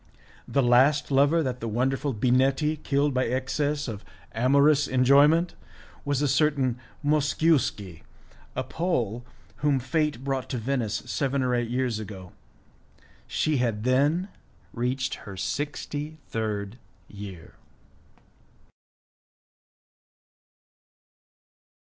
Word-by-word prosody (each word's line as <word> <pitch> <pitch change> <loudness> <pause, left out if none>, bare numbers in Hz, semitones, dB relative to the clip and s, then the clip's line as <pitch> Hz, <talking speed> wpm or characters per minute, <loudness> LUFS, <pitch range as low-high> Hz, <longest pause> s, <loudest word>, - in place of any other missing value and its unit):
The 140 - +1
last 135 +5 +4
lover 145 +5 +4
that 125 -2 -3
the 115 - -4
wonderful 130 +5 0
Binetti 135 +6 +2
killed 140 0 +1
by 130 0 +1
excess 145 +4 -1
of 105 -3 -6 0.3
amorous 140 +5 +4
enjoyment 140 +7 +4 0.5
was 145 0 0
a - - +3
certain 135 -3 +1 0.3
Mosciuski, 145 - +1 0.5
a 130 - -1
Pole, 125 - -2 0.3
whom 145 -2 +1
fate 150 -1 -1
brought 135 -2 -2
to 125 - -2
Venice 120 -2 -2
seven 140 -1 -1
or 125 -1 0
eight 120 -1 0
years 125 -2 -1
ago; 95 -4 -8 1.0
she 155 -2 0
had 115 -4 -1
then 145 - +2 0.4
reached 125 +2 -1 0.2
her 95 - -8
sixty 145 +5 -4
third 110 0 -3 0.3
year! 100 -5 -10
130 Hz, 100 wpm, -26 LUFS, 120-145 Hz, 1.0 s, last